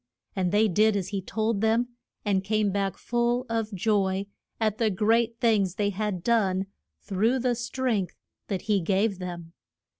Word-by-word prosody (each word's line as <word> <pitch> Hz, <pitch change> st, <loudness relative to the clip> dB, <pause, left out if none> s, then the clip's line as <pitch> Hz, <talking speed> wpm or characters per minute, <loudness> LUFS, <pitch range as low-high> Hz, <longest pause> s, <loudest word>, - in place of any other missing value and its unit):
And 185 Hz, -2 st, 0 dB
they 210 Hz, +2 st, +4 dB
did 215 Hz, +3 st, +3 dB
as 190 Hz, -2 st, -2 dB
he 200 Hz, -1 st, -2 dB
told 215 Hz, +2 st, -1 dB
them, 225 Hz, +2 st, +2 dB, 0.4 s
and 195 Hz, -2 st, +1 dB
came 210 Hz, 0 st, +1 dB
back 195 Hz, -1 st, -1 dB
full 240 Hz, +1 st, 0 dB
of 225 Hz, -1 st, -1 dB
joy 195 Hz, -1 st, +1 dB, 0.3 s
at 215 Hz, -2 st, 0 dB
the 225 Hz, -2 st, +3 dB
great 225 Hz, +3 st, +1 dB
things 205 Hz, -6 st, +2 dB
they 205 Hz, 0 st, 0 dB
had 200 Hz, -3 st, -3 dB
done 195 Hz, -5 st, +2 dB, 0.4 s
through 215 Hz, +6 st, +1 dB
the 250 Hz, -1 st, +1 dB
strength 240 Hz, -4 st, -2 dB, 0.3 s
that 190 Hz, -3 st, -3 dB
he 205 Hz, -3 st, +1 dB
gave 195 Hz, +3 st, +1 dB
them. 175 Hz, -2 st, -7 dB
210 Hz, 160 wpm, -27 LUFS, 190-225 Hz, 0.4 s, they